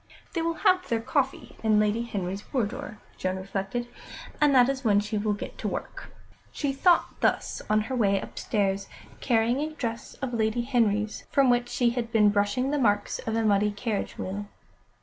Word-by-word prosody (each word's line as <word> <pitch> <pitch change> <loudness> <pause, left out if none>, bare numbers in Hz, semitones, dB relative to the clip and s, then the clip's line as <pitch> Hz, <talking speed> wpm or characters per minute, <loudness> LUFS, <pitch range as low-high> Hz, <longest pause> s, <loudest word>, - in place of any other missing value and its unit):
"They 335 - 0
will 330 0 0
have 365 0 +4
their 230 - +1
coffee 270 +3 -2
in 215 -1 +3
Lady 210 +2 +2
Henry's 195 -4 -3
boudoir," 245 -1 -3 0.2
Joan 185 0 -1
reflected, 195 +5 -3 0.5
"and 290 -2 +5
that 250 -1 +7
is 270 0 -2
when 205 -3 +4
she 210 +1 -2
will 210 0 0
get 205 - -7
to - - -2
work." - - -5 0.4
She 285 -2 -2
thought 345 +5 +2
thus - - 0
on 215 0 +4
her 260 +5 -3
way 200 -5 +2
upstairs, 195 -1 -2 0.3
carrying 235 +1 +2
a 305 +2 -1
dress 230 -4 -4
of 265 -3 -5
Lady 220 +1 +1
Henry's, 220 -4 0
from 270 -3 +4
which 240 0 +1
she 245 -1 +2
had 235 -1 -3
been 210 -3 +5
brushing 205 +6 +1
the 295 - +1
marks 205 -4 +1
of 225 - 0
a 225 - +1
muddy 205 0 +3
carriage 205 0 -3
wheel. 205 +2 -4
225 Hz, 185 wpm, -27 LUFS, 205-255 Hz, 0.5 s, that